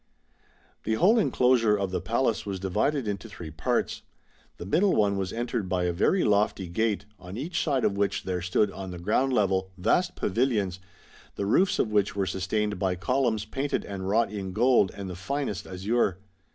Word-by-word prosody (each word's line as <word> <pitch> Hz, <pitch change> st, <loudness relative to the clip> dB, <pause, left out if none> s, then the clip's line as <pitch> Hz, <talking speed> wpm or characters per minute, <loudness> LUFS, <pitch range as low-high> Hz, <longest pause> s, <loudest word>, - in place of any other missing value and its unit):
The 110 Hz, -, 0 dB
whole 210 Hz, -, +4 dB
enclosure 125 Hz, -, +3 dB
of 100 Hz, -2 st, -2 dB
the -, -, -2 dB
Palace 115 Hz, -1 st, 0 dB
was 100 Hz, -2 st, -4 dB
divided 110 Hz, +8 st, 0 dB
into 105 Hz, +2 st, -4 dB
three 85 Hz, -6 st, -8 dB
parts. 75 Hz, -, -1 dB, 0.6 s
The -, -, -7 dB
middle 180 Hz, -, +2 dB
one 100 Hz, -2 st, +2 dB
was 95 Hz, -1 st, -2 dB
entered 115 Hz, -4 st, -3 dB
by 90 Hz, -1 st, 0 dB
a 90 Hz, -1 st, 0 dB
very 180 Hz, -, +2 dB
lofty 100 Hz, -2 st, +1 dB
gate, 100 Hz, +2 st, -1 dB
on 90 Hz, +3 st, -8 dB
each 160 Hz, +6 st, -2 dB
side 140 Hz, -5 st, +1 dB
of 100 Hz, -, +1 dB
which 100 Hz, 0 st, 0 dB
there 90 Hz, -1 st, -2 dB
stood 90 Hz, +3 st, +1 dB
on 95 Hz, 0 st, -7 dB
the 90 Hz, -, -6 dB
ground 110 Hz, +9 st, +1 dB
level 95 Hz, -5 st, +1 dB
vast 175 Hz, -, +1 dB
pavilions, 105 Hz, -4 st, 0 dB, 0.6 s
the 100 Hz, -, -2 dB
roofs 180 Hz, -, +3 dB
of 110 Hz, -, 0 dB
which 105 Hz, -1 st, +1 dB
were 100 Hz, -1 st, 0 dB
sustained 100 Hz, +2 st, -1 dB
by 95 Hz, -1 st, 0 dB
columns 115 Hz, +1 st, 0 dB
painted 135 Hz, +6 st, -2 dB
and 95 Hz, -1 st, -5 dB
wrought 115 Hz, +1 st, +2 dB
in 95 Hz, -3 st, -5 dB
gold 120 Hz, -3 st, +4 dB
and 100 Hz, -1 st, -5 dB
the 90 Hz, -, -6 dB
finest 105 Hz, +1 st, -3 dB
azure. 95 Hz, +1 st, 0 dB
105 Hz, 185 wpm, -27 LUFS, 95-120 Hz, 0.6 s, whole